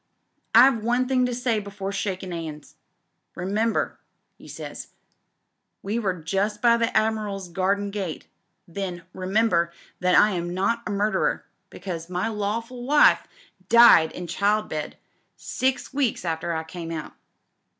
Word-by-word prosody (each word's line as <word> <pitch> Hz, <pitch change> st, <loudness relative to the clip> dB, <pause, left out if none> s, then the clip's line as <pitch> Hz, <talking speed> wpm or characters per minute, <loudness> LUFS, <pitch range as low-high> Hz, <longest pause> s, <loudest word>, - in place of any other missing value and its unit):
'I've 240 Hz, -1 st, +7 dB
one 245 Hz, +2 st, +1 dB
thing 255 Hz, -1 st, +2 dB
to 245 Hz, -, -3 dB
say 240 Hz, -3 st, 0 dB
before 200 Hz, -1 st, -6 dB
sliakin' 190 Hz, -2 st, -3 dB
'ands. 155 Hz, -3 st, -7 dB, 0.6 s
Remem 205 Hz, +6 st, 0 dB
ber,' -, -, -2 dB, 0.4 s
'e -, -, -14 dB
says -, -, -8 dB, 0.5 s
— -, -, -53 dB
we 210 Hz, +4 st, -1 dB
were 195 Hz, -5 st, -1 dB
just 195 Hz, +5 st, -2 dB
by 235 Hz, +1 st, +5 dB
the 230 Hz, 0 st, +1 dB
Admiral's 210 Hz, -4 st, -1 dB
garden 200 Hz, +3 st, 0 dB
gate 195 Hz, -6 st, -5 dB, 0.4 s
then 180 Hz, -1 st, -5 dB
— -, -, -45 dB
^'remember, 185 Hz, -2 st, +1 dB, 0.3 s
that 180 Hz, 0 st, +2 dB
I 210 Hz, -, +6 dB
am 175 Hz, -1 st, -3 dB
not 215 Hz, +5 st, 0 dB
a -, -, -2 dB
murderer, 205 Hz, -1 st, 0 dB, 0.2 s
because 175 Hz, -2 st, -7 dB
my 180 Hz, +4 st, -1 dB
lawful 225 Hz, +4 st, -3 dB
wife 295 Hz, +4 st, +4 dB, 0.4 s
died 235 Hz, -9 st, +7 dB
in 180 Hz, -, -6 dB
childbed 200 Hz, -5 st, -1 dB, 0.4 s
six 260 Hz, 0 st, -2 dB
weeks 265 Hz, -9 st, 0 dB
after 165 Hz, +1 st, -2 dB
I 160 Hz, -1 st, -2 dB
came 165 Hz, +1 st, -8 dB
out. 160 Hz, -2 st, -6 dB
200 Hz, 145 wpm, -24 LUFS, 180-225 Hz, 0.6 s, I've